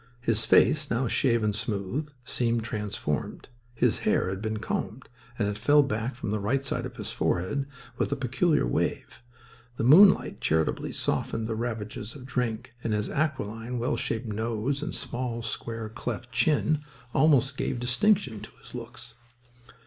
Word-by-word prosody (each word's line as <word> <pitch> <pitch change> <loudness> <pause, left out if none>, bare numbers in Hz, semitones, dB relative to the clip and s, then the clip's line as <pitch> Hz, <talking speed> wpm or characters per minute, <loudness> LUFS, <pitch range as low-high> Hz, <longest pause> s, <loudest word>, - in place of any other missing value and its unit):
His 115 -2 +1
face, 150 -2 +4
now 120 +2 +1
shaven 115 -4 +2
smooth, 110 +8 -2
seemed 120 -2 0
transformed. 105 - -3 0.3
His - - +2
hair - - +1
had 95 +1 -4
been 110 0 -2
combed, 110 +3 -4 0.3
and 105 - +1
it 105 0 -3
fell 145 +6 +5
back 115 -1 -2
from 115 -4 -4
the 105 - 0
right 130 +7 0
side - - -2
of - - -13
his - - -5
forehead 135 +11 0 0.3
with - - 0
a - - +2
peculiar 135 - +1
wave. - - -2 0.6
The - - -1
moonlight 185 - +6
charitably 80 0 +1
softened 115 - -1
the 115 - -2
ravages 110 -1 -4
of 130 -3 -10
drink; 125 -2 -2
and 110 - 0
his 105 0 -1
aquiline, 125 -5 -2
well 120 +5 0
shaped 115 +2 -2
nose 115 +5 -2
and 150 - -3
small, 120 -3 -3
square 115 0 -4
cleft 120 +2 -5
chin 150 +4 +2 0.3
almost 140 -2 +4
gave 125 - -2
distinction 125 - +2
to 110 - -9
his - - -15
looks. 120 -1 -8
120 Hz, 155 wpm, -27 LUFS, 110-135 Hz, 0.6 s, moonlight